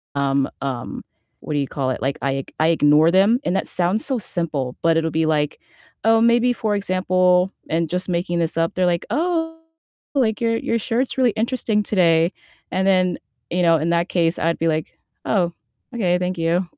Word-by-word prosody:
um, 135 -2 -2 0.4
what 150 - -6
do 145 - +1
you 140 - -1
call 135 -2 -2
it? - - -4
Like 135 +2 -1
I 135 - 0
ig - - -17
I 160 - +3
ignore 155 0 +4
them, 200 +7 +4
and 180 - 0
that - - -1
sounds 180 +5 +1
so 265 -3 0
simple, 155 - -2
but 165 -1 +3
it'll 160 0 0
be 160 +1 +1
like, 150 -2 0 0.4
oh, 225 0 +4
maybe 240 +1 +3
for 215 -3 -1
example 185 -1 +2 0.2
and 165 0 0
just 180 +1 -2
making 175 0 -1
this 165 -1 -2
up, 165 0 +1
they're 185 0 +1
like, 175 -1 0
"Oh, 325 0 -1 0.6
like 220 -6 +1
your 230 0 +1
your 230 - -1
shirt's 245 +4 -2
really 250 -3 +3
interesting 225 -2 -1
today." 170 -4 +2 0.4
And 190 +1 0
then, 185 -2 +2 0.3
you 180 - -1
know, 165 -1 +5
in 160 +2 -1
that 170 +1 +1
case 170 -1 +1
I'd 165 +1 0
be 165 - +1
like, 155 0 -3 0.3
"Oh, 175 -5 +1 0.4
okay. 180 -6 +1
Thank 180 0 -2
you." 165 +2 +1
180 Hz, 195 wpm, -21 LUFS, 160-210 Hz, 0.6 s, know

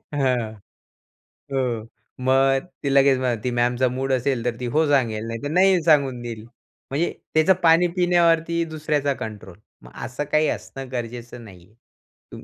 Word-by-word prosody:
हां. 125 -6 0 1.0
हो, 120 -4 -2 0.4
मग 135 +3 +3 0.2
ती 140 - 0
लगेच 135 -1 +4
मग 125 -3 -1
ती 125 - -1
मॅमचा 125 +1 +2
मूड 130 +2 -3
असेल 130 -1 0
तर, 120 -1 0
ती 125 - -4
हो 160 +1 +4
सांगेल, 115 -6 +1
नाहीतर 115 +5 -4
नाही 185 +1 +4
सांगून 140 -6 +3
देईल. 115 -2 -6 0.5
म्हणजे 155 +6 0 0.2
त्याचं 160 +4 +5
पाणी 165 +1 +5
पिण्यावरती 170 -1 +2
दुसऱ्याचा 150 -3 -1
कंट्रोल. 105 -7 -8 0.3
मग - - -14
असं 130 +3 -4
काही 155 0 +3
असणं 135 -1 -6
गरजेचं 120 0 -6
नाही 90 -5 -14
आहे. 110 +4 -18
135 Hz, 150 wpm, -23 LUFS, 120-155 Hz, 1.0 s, त्याचं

